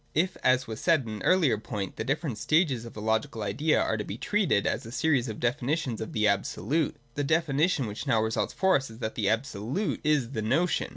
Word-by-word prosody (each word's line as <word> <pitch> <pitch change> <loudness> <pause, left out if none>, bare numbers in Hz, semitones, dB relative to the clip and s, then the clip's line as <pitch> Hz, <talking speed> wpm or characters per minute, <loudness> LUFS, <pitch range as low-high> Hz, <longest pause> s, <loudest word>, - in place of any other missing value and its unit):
If, 180 +4 +1
as 130 0 +3
was 110 0 -6
said 165 -4 +4
at - - -10
an 110 -2 -6
earlier 160 - +3
point, 105 -4 -5
the - - -3
different 135 -2 -2
stages 150 - +2
of 115 - -9
the 105 - -7
logical 110 0 0
idea 150 +9 +1
are 110 - 0
to 105 - -3
be 100 - -6
treated 190 - +1
as - - -1
a 115 - -9
series 130 -1 +1
of 110 - -6
definitions 125 +1 -1
of 110 - -5
the 105 -1 +2
Absolute, 105 - 0 0.2
the 145 - -2
definition 155 -1 +2
which 105 +6 -6
now 115 -5 +3
results 110 0 -1
for 190 0 +3
us 135 -2 0
is 110 - -11
that 110 -2 -4
the 105 -3 0
Absolute 120 - -2
is 145 -5 +1
the 110 -5 -3
Notion. 145 +11 +1
125 Hz, 225 wpm, -28 LUFS, 110-155 Hz, 0.2 s, said